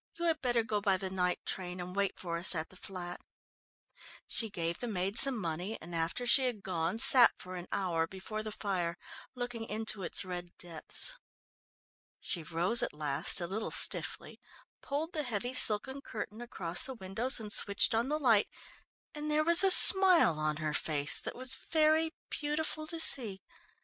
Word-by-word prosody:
You 340 - -6
had 320 -3 -2
better 240 -3 -2
go 215 -2 -5
by 195 -2 -1
the 190 0 -8
night 180 -1 -4
train 180 -1 -7
and 180 +1 -9
wait 200 -1 -3
for 170 -2 -6
us 180 +1 0
at 160 0 -5
the - - -20
flat." 180 -2 -10 1.0
She 225 - 0
gave 170 -3 -5
the 245 - -7
maid 195 -2 -4
some 270 +1 +7
money 180 +2 -7
and 170 +2 -14
after 165 +9 -5
she 260 +2 +4
had 230 -5 -5
gone, 175 +1 -4
sat 240 +1 +7
for 185 0 -12
an 175 0 -10
hour 170 -4 -4
before 190 +4 -9
the 215 0 -8
fire 180 -5 -5 0.4
looking 245 -2 -7
into 220 -1 -5
its 180 +2 -4
red 175 -1 -10
depths. 175 - -6 1.0
She 175 - -2
rose 170 +8 -1
at - - -5
last 145 +1 +4
a 175 - -4
little 205 +5 -6
stiffly, - - +3 0.4
pulled 305 +5 -6
the 310 - -4
heavy 245 -2 -6
silken 255 +3 +4
curtain 215 -2 -10
across 180 -8 +1
the 265 - -9
windows 225 +5 +1
and 215 -1 0
switched 200 +2 +4
on 230 +4 -2
the 300 - -3
light, 235 -8 +1 0.7
and 300 0 -8
there 305 0 -1
was 340 +3 +4
a 390 - +4
smile 365 - +7
on 155 -1 -3
her 155 -1 -6
face 145 -2 +2
that - - -8
was 255 +1 -3 0.2
very 315 0 0 0.2
beautiful 310 +1 -6
to 330 +1 -6
see. 225 -11 +3
205 Hz, 180 wpm, -29 LUFS, 175-255 Hz, 1.0 s, some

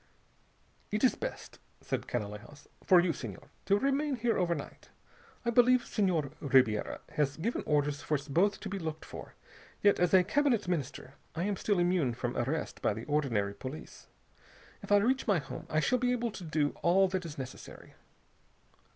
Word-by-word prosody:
"It - - -1
is - - +5
best," - - -7 0.2
said - - -4
Canalejas, 110 +5 -6 0.2
"for 185 - +6
you, 175 -1 +2
Senhor, 115 -8 -8 0.2
to 200 - +4
remain 275 +4 +1
here 240 -1 0
overnight. 170 -5 -3 0.6
I 235 - +2
believe 245 +1 +5
Senhor 175 - 0
Ribiera 130 -7 +2
has 145 -2 0
given 215 +9 -2
orders 145 -1 +1
for 155 - 0
us 140 0 -4
both 185 +8 +2
to - - -5
be 195 0 -4
looked 160 -2 -5
for, - - -10 0.5
yet 205 -1 +5
as 180 0 +3
a 185 - +7
Cabinet 235 0 +1
Minister 145 -6 -3 0.2
I 170 - -1
am 205 +1 0
still 205 +1 0
immune 175 -8 +1
from 120 +1 -3
arrest 145 +6 -2
by - - +1
the - - -7
ordinary 120 -10 0
police. 130 +8 -9 0.7
If - - -9
I 205 - +7
reach 250 +6 +1
my 200 -4 +4
home 145 - -7
I 155 - +2
shall 250 +11 +2
be 245 0 +1
able 235 -2 -1
to 200 - -8
do 155 -3 +1
all 190 +3 +4
that 185 -1 -2
is 160 -3 -8
necessary." 130 -1 -9
170 Hz, 175 wpm, -31 LUFS, 140-205 Hz, 0.7 s, a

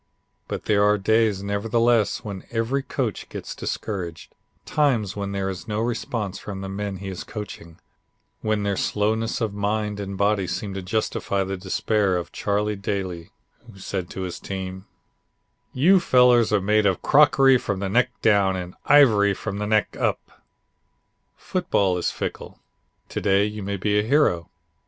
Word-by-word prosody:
But - - -5
there 100 -1 +3
are 105 0 +4
days 110 -1 +2
nevertheless 115 +2 +1
when 100 -3 -6
every 120 +4 -1
coach - - -3
gets - - -6
discouraged; 90 -6 -5 0.3
times 120 -10 +1
when 100 -1 -3
there 100 -1 -2
is 95 -2 -5
no 105 -1 -2
response 115 -3 -3
from 100 -2 -7
the 95 - -5
men 100 0 -4
he 95 +1 -6
is 95 - -6
coaching 95 -6 -8 0.6
when 110 -1 0
their 100 -1 0
slowness 110 +3 0
of 110 -3 -1
mind 105 0 -1
and 100 -1 -5
body 100 -1 +1
seem 100 +1 -4
to 95 - -4
justify 100 0 -1
the 95 +1 -3
despair 95 +1 0
of 85 - -5
Charlie 105 +1 -1
Daly 95 -4 -4 0.4
who 95 - -16
said 95 -2 -4
to 95 - -6
his 90 -2 -5
team: 95 0 -6 0.8
"You 180 +9 +5
fellows 125 -7 +4
are 105 - +3
made 105 +1 +3
of 95 - 0
crockery 135 -3 +5
from 100 -4 -3
the 100 - -2
neck 125 +6 +2
down 100 -3 +4
and 90 -1 -5
ivory 105 -9 +5
from 100 0 -5
the 105 - -2
neck 110 0 +1
up." - - -3 1.0
Football 95 -3 0
is - - 0
fickle. - - -6 0.5
To - - -4
day 100 0 +3
you 105 0 -5
may 100 +1 -3
be 105 +2 +1
a - - +1
hero. 110 - +2
100 Hz, 165 wpm, -24 LUFS, 95-110 Hz, 1.0 s, You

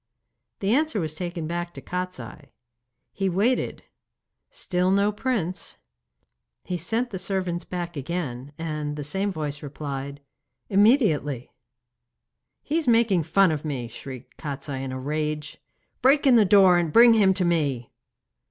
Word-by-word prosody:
The 200 +2 +2
answer 300 -4 +1
was 155 -3 -2
taken 175 0 -4
back 175 +1 -4
to - - -7
Kostiei. 180 -5 -6 0.6
He 195 -1 -1
waited; 210 +8 0 0.7
still 185 - -1
no 200 +2 +3
prince. 210 -6 -3 0.9
He 180 - -4
sent 225 +9 -2
the 190 - -4
servants 185 -2 -3
back 175 -1 -5
again, 140 -3 -4
and 150 -2 -3
the 150 - -5
same 195 +8 -1
voice 150 -4 -4
replied, 140 -1 -6 0.5
'Immediately.' 195 - +3 1.1
'He 315 +3 0
is 320 - -5
making 225 -6 +4
fun 190 +1 +4
of 150 -2 -3
me!' 135 -6 -3
shrieked 130 +2 -10
Kostiei 140 -2 -5
in 135 -1 -4
a 130 - -4
rage. 150 +2 -3 0.4
'Break 280 +3 +4
in 265 - +6
the 225 -3 +6
door, 185 -2 +6
and 170 -3 -1
bring 235 +5 +8
him 205 -4 +5
to 185 -2 +1
me! 145 -8 0
175 Hz, 145 wpm, -25 LUFS, 150-200 Hz, 1.1 s, bring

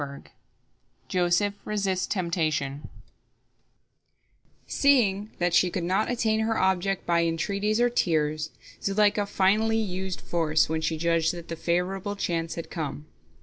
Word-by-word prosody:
" - - -42
JOSEPH 180 +3 +2
RESISTS 195 -3 -1
TEMPTATION 155 -6 -1 1.8
Seeing 215 -8 +2
that 175 -1 0
she 180 +1 +4
could 175 0 -3
not 190 +5 +1
attain 225 -3 +1
her 220 0 0
object 190 +1 +1
by 170 -1 +2
entreaties 200 +6 0
or 240 - +4
tears, 155 -6 0 0.3
Zuleika 205 +1 +2
finally 210 +3 +2
used 190 -3 -3
force, 160 -2 +1
when 160 0 -1
she 160 0 -1
judged 165 0 +1
that 170 -1 -9
the 165 - -3
favorable 180 +4 -1
chance 165 -4 -2
had 165 - -7
come. 150 -2 -4
180 Hz, 130 wpm, -26 LUFS, 165-205 Hz, 1.8 s, she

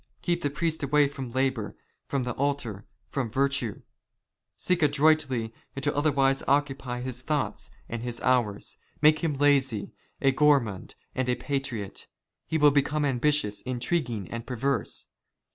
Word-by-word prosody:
Keep 175 -1 0
the 145 - 0
priest 160 +2 -1
away 145 +1 +4
from 135 -3 -6
labour, 130 -4 -1 0.3
from 140 -2 -1
the 125 - -2
altar, 125 -7 -2
*' - - -44
from 130 -5 -1
virtue. 135 -3 0 0.7
Seek 180 -2 0
adroitly 145 -6 +3 0.3
to 145 +1 -1
otherwise 140 -2 +2
occupy 135 -3 0
his 125 -1 -5
thoughts 150 +1 -2
" - - -31
and 115 -1 -4
his 120 -1 -3
hours. 120 -6 +1 0.3
Make 155 +1 +6
him 160 -4 0
lazy, 135 -6 +2 0.3
a 135 - +4
gourmand, 135 -9 +2 0.2
and 130 -1 -1
a 125 - +3
patriot. 135 -9 -4 0.4
"He 160 - 0
will 150 -1 +6
become 145 +1 +1
ambitious, 130 -5 +1
intriguing, 125 - -2
and 115 0 -5
perverse. 135 +2 -1
135 Hz, 145 wpm, -27 LUFS, 120-145 Hz, 0.7 s, Make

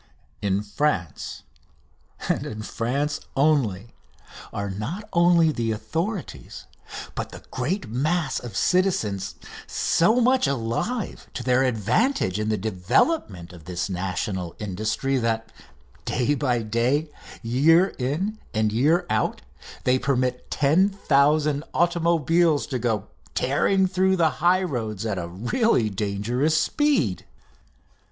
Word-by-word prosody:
In 100 0 0
France, 100 - -2 0.8
and - - 0
in 110 0 -6
France 140 +7 -2 0.2
only, 130 -8 +1 0.6
are 100 -1 -3
not 140 - -5
only 170 -2 +5
the 115 -5 -1
authorities, 155 - -4 0.5
but - - -4
the - - -11
great 155 - -2
mass 150 +6 0
of 120 -2 -7
citizens, 115 - +1 0.3
so 215 +9 +2
much 250 - +3
alive 140 - -2
to - - -4
their 130 0 +3
advantage 125 - +1
in 105 0 -1
the 110 - +1
development 95 - 0
of 85 -3 -13
this 90 +2 -3
national 90 -1 -3
industry 110 +7 -1
that, 115 -1 -1 0.5
day 125 +3 0
by 125 -5 0
day, 125 +8 0 0.3
year 160 +11 +4
in 175 +12 -2 0.2
and 110 0 +2
year 155 +10 +3
out, - - -1 0.4
they 130 0 +3
permit 125 -1 -1
ten 160 +7 +3
thousand 150 -4 +2
automobiles 170 -2 +2
to 130 -3 -3
go 110 -4 -1 0.3
tearing 170 +9 +2
through 190 0 +2
the 165 -4 +3
highroads 135 - +1
at 100 -4 -1
a 85 - -4
really 115 - +1
dangerous 110 +10 0
speed. 275 - +1
130 Hz, 115 wpm, -24 LUFS, 110-170 Hz, 0.8 s, only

